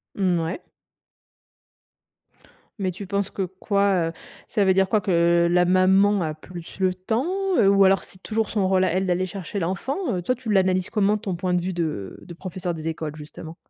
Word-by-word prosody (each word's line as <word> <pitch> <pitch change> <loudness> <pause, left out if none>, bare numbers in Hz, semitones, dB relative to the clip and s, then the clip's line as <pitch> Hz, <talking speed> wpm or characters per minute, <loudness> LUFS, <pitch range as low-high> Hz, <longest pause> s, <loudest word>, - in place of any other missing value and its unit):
Mmh 185 -4 +1
ouais. 165 - -4 2.2
Mais 190 -2 0
tu 195 +2 -8
penses 200 0 -1
que 195 - -2
quoi, 190 -1 0
heu, - - -8 0.3
ça 205 -3 +1
veut 190 - +4
dire 190 0 +2
quoi? 215 - +3
Que 170 -2 +3
la 180 0 +4
maman 190 +2 +4
a 155 -2 -2
plus 170 +3 -11
le 185 -1 +2
temps, 220 +8 -2 0.3
heu, 200 -4 +5
ou 195 0 +5
alors 195 +1 +3
c'est 185 - -13
toujours 220 -1 -1
son 200 -4 0
rôle 190 0 +3
à 185 - +2
elle 190 +2 0
d'aller 180 +1 +1
chercher 195 +1 -5
l'enfant, 190 +10 -2 0.2
heu, - - -3
toi, 255 +8 0
tu 245 -2 -8
l'analyses 185 -2 +2
comment? 210 -1 +2
Ton 200 -4 -4
point 180 +1 -2
de 175 - +2
vue 185 +2 -2
de 155 - -3
de 175 - -10
professeur 180 0 -5
des 160 0 -4
écoles, 155 -2 -5
justement. 155 +2 -10
185 Hz, 200 wpm, -24 LUFS, 175-200 Hz, 2.2 s, heu